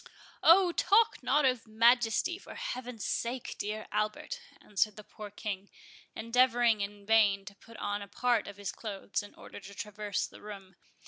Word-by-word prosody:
"Oh, 355 +2 +7
talk 425 +6 +3
not 295 - +3
to 255 -2 +3
Majesty, 235 - +3
for - - -11
Heaven's 250 - -5
sake, 240 +1 -2
dear 215 +1 -3
Albert!" 215 - -2 0.2
answered 210 +1 0
the 210 - -10
poor 210 +1 -10
King, 200 -1 -5 0.5
endeavouring 235 -1 +3
in 200 0 -5
vain 205 -3 +4
to 205 - -9
put 230 +3 -15
on 205 0 -2
a 200 - -7
part 240 0 +1
of 200 -1 -9
his 205 -1 -4
clothes, 205 -2 -4
in 205 - -13
order - - -11
to 200 0 -12
traverse 210 -1 -3
the - - -13
room. 195 -3 -10
215 Hz, 170 wpm, -31 LUFS, 205-245 Hz, 0.5 s, Oh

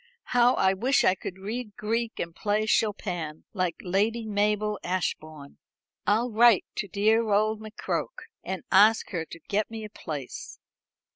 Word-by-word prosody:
How 245 0 +5
I 190 0 +3
wish 250 +8 +2
I - - +5
could 190 -1 -7
read 210 +2 -5
Greek 225 +2 -2
and 170 0 -4
play 210 +2 0
Chopin, 180 -8 -1
like 180 -4 -1
Lady 215 +5 0
Mabel 210 0 0
Ashbourne. 155 -5 -4 0.5
I'll 230 +4 +2
write 230 -2 +5
to 205 - -2
dear 215 +4 +2
old 215 +1 +2
McCroke, 220 - -4 0.2
and 190 -1 -4
ask 215 +3 +5
her 170 -4 -2
to 165 - -11
get 210 +1 0
me 225 -1 -7
a 210 - -8
place." 150 -10 -7
210 Hz, 150 wpm, -27 LUFS, 185-220 Hz, 0.5 s, How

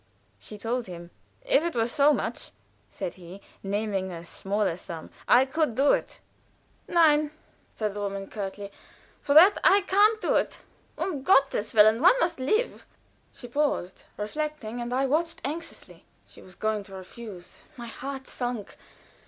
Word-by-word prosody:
She 210 - -9
told 230 +2 -3
him. 175 -1 -9 0.3
"If - - +4
it 340 -2 -3
were 225 -1 +1
so 280 +4 +4
much," 240 -4 -3 0.4
said 170 - -5
he, 180 +1 -12 0.2
naming 200 -1 -2
a 170 -1 -8
smaller 200 0 -1
sum, 170 -2 -9 0.2
"I 255 +2 +6
could 300 -3 -1
do 280 +3 +4
it." - - -3 0.7
"Nie!" 305 -3 +4 0.5
said 215 -2 -2
the 205 - -6
woman, 195 -1 -4
curtly, 200 0 -6 0.5
"for 285 - 0
that 370 +6 +8
I 400 +1 +6
can't 410 +3 +3
do - - +2
it. - - -1 0.4
Um 300 -9 -3
Gotteswillen! 225 - +4
One 370 +10 +6
must 345 - 0
live." 430 - -1 0.4
She 245 - -11
paused, 245 -9 -2
reflecting, 245 0 -4
and 240 0 -5
I 265 +2 +1
watched 325 +5 0
anxiously. 330 +4 -7 0.2
She - - -16
was 185 - -16
going 215 -1 -1
to 195 -1 -11
refuse. 190 -1 -11
My 240 - -7
heart 265 +3 -7
sunk. 245 -5 -5
240 Hz, 155 wpm, -27 LUFS, 200-300 Hz, 0.7 s, that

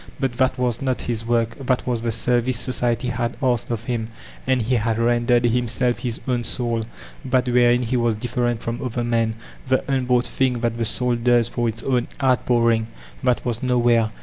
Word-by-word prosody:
But 135 -3 -1
that 130 0 +2
was 125 -1 -1
not 130 -2 0
hb 115 -2 -3
work; 115 -1 +1
that 130 -1 0
was 120 -3 -1
the 115 - -1
service 120 +2 +2
society 125 0 0
had 120 -1 -2
asked 120 -3 +1
of 115 -2 -3
him 115 -2 -2 0.4
and 130 -1 +2
he 120 +2 -1
had 115 -1 +1
rendered; 120 +1 +2
himself, 120 0 +1
his 120 -2 -3
own 125 -2 0
soul, 115 -1 -1 0.4
that 130 -1 +1
wherein 120 0 +3
be 125 +3 0
was 120 -2 +1
diflPerent 120 +1 -1
from 115 +1 -4
other 120 -1 -2
men, 115 -2 0 0.3
the 130 0 +4
unboQght 125 -3 +1
thing 125 -3 0
Aat 115 0 -1
the 115 - +1
soul 125 +2 0
does 120 -1 +3
for 120 -1 -1
its 115 +1 -3
own 125 -3 0
outpouring, 120 -4 +2 0.2
— - - -21
that 125 - +1
was 120 -2 -2
no 125 -1 +1
where. 120 -2 +3
120 Hz, 200 wpm, -22 LUFS, 115-125 Hz, 0.4 s, the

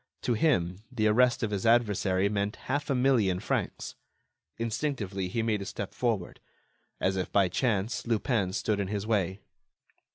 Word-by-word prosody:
To 120 - +1
him, 100 - +1
the 110 -4 0
arrest 120 +3 +4
of 110 - -1
his 100 -2 -2
adversary 105 -5 +3
meant 100 0 -1
half 145 +3 -2
a 140 - +2
million 120 -8 +3
francs. - - -2 0.6
Instinctively, 115 -5 -2
he 115 +5 -1
made 110 -3 0
a - - -4
step 100 0 -5
forward. 110 -8 -2 0.6
As 95 +1 +1
if 95 - -2
by 100 -2 +3
chance, 110 +2 -1
Lupin 110 -4 +1
stood 105 0 0
in 100 - -1
his 100 0 -3
way. 100 -3 0
105 Hz, 160 wpm, -29 LUFS, 95-120 Hz, 0.6 s, arrest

